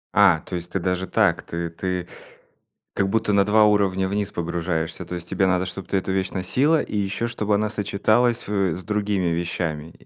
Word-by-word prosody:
А, 80 - +5
то 90 - -5
есть 85 0 -6
ты 95 - -1
даже 90 +1 -1
так. 100 -7 +2
Ты 85 0 -4
ты 90 +1 -3 0.9
как 100 - +1
будто 110 0 +1
на 100 -1 +4
2 110 +1 +5
уровня 95 -3 +2
вниз 100 0 -2
погружаешься, 85 0 -2
то 90 - -5
есть 85 - -8
тебе 95 - +1
надо, 95 0 +1
чтоб 90 0 -7
ты - - -2
эту 95 0 -2
вещь 95 -1 -1
носила, 135 - +2
и 105 - -4
ещё 100 +3 -1
чтобы 105 -3 0
она 105 +1 0
сочеталась, 110 +4 +1
э, 95 -5 +1
с 90 - -7
другими 105 -4 0
вещами? 85 -2 -3
95 Hz, 195 wpm, -23 LUFS, 90-105 Hz, 0.9 s, А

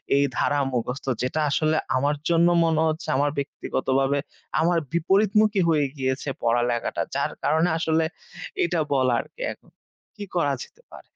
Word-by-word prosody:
এই 140 - +4
ধারা 145 0 +1
মুখস্থ। 125 +2 -3 0.2
যেটা 130 +5 -1
আসলে 155 +2 +1 0.2
আমার 145 +3 +1
জন্য 170 0 +4 0.2
মনে 160 -1 +2
হচ্ছে, 155 +1 -3
আমার 145 +1 +2
ব্যক্তিগতভাবে 135 0 0 0.4
আমার 170 +1 +3
বিপরীতমুখী 200 +4 +3
হয়ে 150 -3 +3
গিয়েছে 130 +1 -2
পড়ালেখাটা। 120 0 0
যার - - 0
কারণে 160 +3 +2
আসলে 160 -1 +1 0.6
এটা 175 - 0
বলার 130 -3 +2
কি - - -12
এখন, - - -24 0.5
কি 210 - -7
করা 145 -5 +2
যেতে 485 - -18
পারে? - - -11
150 Hz, 145 wpm, -24 LUFS, 135-170 Hz, 0.6 s, এই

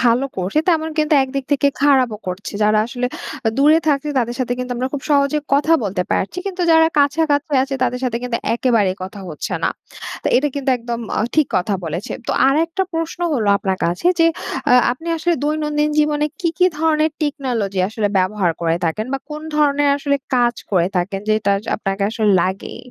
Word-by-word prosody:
ভালো 245 +2 +3
করছে, 190 +10 -1
তেমন 320 -2 +2
কিন্তু 305 0 +3
একদিক 270 0 -4
থেকে 285 0 +2 0.2
খারাপও 260 -7 +3
করছে। 185 +2 -5
যারা 215 0 +3
আসলে 245 +1 -3 0.4
আ - - +5
দূরে 300 +3 +6
থাকছে, 290 0 +1
তাদের 240 0 -1
সাথে 245 -1 -1
কিন্তু 250 0 -4
আমরা 255 +2 -1
খুব 280 - -4
সহজে 280 +1 +3 0.2
কথা 300 +3 +2
বলতে 190 -2 -1
পারছি। 200 - -1
কিন্তু 370 -2 -3
যারা 320 0 +6
কাছাকাছি 290 +1 +1
আছে, 270 0 -3
তাদের 250 0 0
সাথে 240 -2 -1
কিন্তু 245 -2 -1 0.2
একেবারে 230 -6 +2
কথা 190 +2 -7
হচ্ছে 155 - -4
না। - - +2 0.5
তো - - -1
এটা 295 +3 +2
কিন্তু 275 -1 -1
একদম 235 0 -4 0.2
অ - - +2
ঠিক 310 -3 +4
কথা 190 +3 0
বলেছেন। 165 +5 -4
তো - - +1 0.2
আরেকটা 330 +6 +1
প্রশ্ন 330 +1 -3
হলো 220 -7 0
আপনার 190 -1 -1
কাছে, 175 - -1
যে 330 - +6 0.4
আ - - +6 0.2
আপনি 325 +7 -8
আসলে 335 +2 +1
দৈনন্দিন 300 0 0
জীবনে 300 0 +2
কী, 340 - +1
কী 365 - +5
ধরনের 315 0 +2
টেকনোলজি 245 -10 -1
আসলে 215 -1 -1
ব্যবহার 185 -1 +1
করে 165 0 +1
থাকেন? 215 +8 -1
বা 275 - 0
কোন 300 +1 -6
ধরনের 290 -1 +3
আসলে 280 0 0 0.2
কাজ 240 -1 +3 0.2
করে 175 -2 +3
থাকেন, 195 +2 -1
যেটা 215 -2 +2
জ - - -15
আপনাকে 195 -1 -3
আসলে 215 -2 +1
লাগে? 190 +1 -3
260 Hz, 190 wpm, -19 LUFS, 210-300 Hz, 0.5 s, দূরে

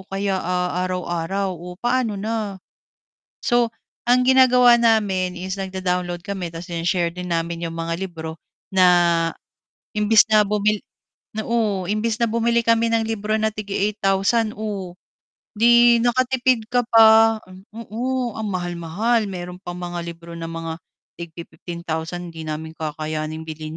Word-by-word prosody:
kaya, 195 -1 -1
ah, 180 0 -1
araw-araw, 185 +1 -2
oh, 180 +1 -9
paano 240 -2 0
na? 210 -1 -3 0.9
So, 240 -1 +3 0.4
ang 250 +1 +5
ginagawa 250 -2 +6
namin 200 -6 +2
is 185 +2 -5
nagda-download 180 -2 -2
kami 195 -3 -4
tapos 165 +1 -9
shine-share 170 +1 0
din 180 0 -6
namin 170 0 -2
'yong 165 - -7
mga 165 0 -2
libro 160 -4 -6 0.3
na 185 -1 +5 1.1
imbis 210 +1 +5
na 215 -1 +6
bumil 210 0 +1 0.6
oo, 215 -6 0
imbis 215 +2 -1
na 235 - +3
bumili 235 +1 +1
kami 230 0 +3
ng 225 -1 +2
libro 215 -1 -2
na 220 0 +1
tig-e 205 -2 -5 0.2
8000 205 +2 +1
oh, 200 -5 -4 0.6
'di 235 +1 +6
nakatipid 250 -1 +2
ka 245 0 +3
pa 225 0 +6 0.4
oo, 240 +2 -3
ang 220 -1 -3
mahal-mahal. 180 +6 -1
Meron 180 -1 -7
pang 175 -1 -6
mga 175 -1 -4
libro 170 0 -9
na 165 0 -5
mga 165 0 -5 0.4
tigpi-15,000 170 0 -6
'di 160 - -7
namin 160 +1 -5
kakayanin 155 0 -4
bilhin 155 0 -7
195 Hz, 135 wpm, -22 LUFS, 175-225 Hz, 1.1 s, ginagawa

